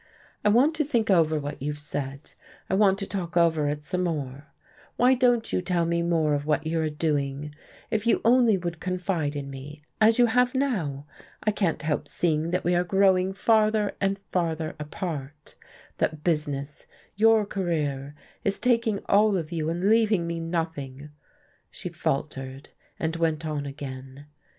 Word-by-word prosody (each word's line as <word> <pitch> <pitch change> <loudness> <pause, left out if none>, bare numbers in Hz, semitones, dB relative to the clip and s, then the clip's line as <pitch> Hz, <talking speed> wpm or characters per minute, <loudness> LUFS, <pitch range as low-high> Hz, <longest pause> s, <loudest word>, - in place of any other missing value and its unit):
I - - +4
want 255 +9 +4
to 305 - +2
think 235 -7 +1
over 160 -4 +4
what 145 -1 -6
you've 150 +1 -3
said, 140 -1 -6 0.4
I - - +1
want 195 -1 +4
to 195 - -4
talk 180 -3 -4
over 160 -3 +3
it 150 0 -4
some 180 +4 -1
more. 145 -3 -4 0.5
Why 255 +2 +5
won't 240 -3 +3
you - - +1
tell 175 -2 0
me 170 0 0
more 165 -3 +1
of 145 0 0
what 155 +1 +1
you 160 +1 0
are 155 - 0
doing? 150 -1 -2 0.4
If 220 +1 0
you 235 - +4
only 235 -3 +5
would 170 -2 -4
confide 180 -5 -2
in 140 -1 -5
me 145 +3 -9 0.2
as 220 +1 +5
you 245 - +6
have 250 +2 +2
now! 175 - -1 0.4
I 215 - +2
can't 195 -6 -1
help 150 -1 -1
seeing 160 -1 0
that 180 +1 -1
we 175 - +2
are 175 0 +3
growing 190 0 +3
farther 215 +1 +2
and 195 0 +1
farther 165 -3 -1
apart, 150 -2 -6 0.5
that 155 -1 -1
business, 145 -4 -2 0.3
your 220 +1 +4
career, 150 -8 -2 0.3
is 200 - 0
taking 230 -4 +1
all 205 0 +4
of 165 -2 -4
you 160 -2 -1
and 175 +4 -1
leaving 215 -5 +3
me 170 0 -3
nothing." 155 -4 -4 0.6
She - - -6
faltered, 135 -1 -3 0.3
and 160 0 -1
went 165 -1 0
on 150 -2 -3
again. 135 0 -8
165 Hz, 170 wpm, -26 LUFS, 150-200 Hz, 0.6 s, you